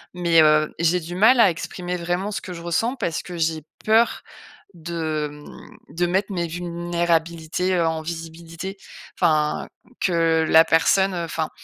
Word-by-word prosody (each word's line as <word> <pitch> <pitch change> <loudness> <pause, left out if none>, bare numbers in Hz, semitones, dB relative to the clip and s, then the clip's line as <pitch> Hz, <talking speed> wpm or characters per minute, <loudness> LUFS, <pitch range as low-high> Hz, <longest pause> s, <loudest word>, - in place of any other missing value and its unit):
mais 170 -2 +4
heu, 155 0 +3
j'ai 170 +2 +2
du 170 +1 -8
mal 220 +7 +5
à 200 -6 +6
exprimer 180 +2 -5
vraiment 175 +4 -2
ce - - -4
que 180 - -8
je 170 - -8
ressens, 225 +10 0
parce 170 -10 -2
que 175 -1 -8
j'ai 160 -1 -1 0.2
peur 225 +2 +3 0.5
de, 160 -2 -3
mmh, 150 0 -13 0.2
de 175 +1 +1
mettre 190 +3 0
mes 175 -2 -2
vulnérabilités, 170 0 -1
heu, 170 -2 +2
en 160 -1 -2
visibilité. 165 +3 -7 0.4
Enfin 155 -3 +1 0.3
que 165 -3 +2
la 160 0 +7
personne, 190 +4 +3
heu, 175 -1 -3
enfin 160 -1 -3
170 Hz, 160 wpm, -22 LUFS, 160-180 Hz, 0.5 s, la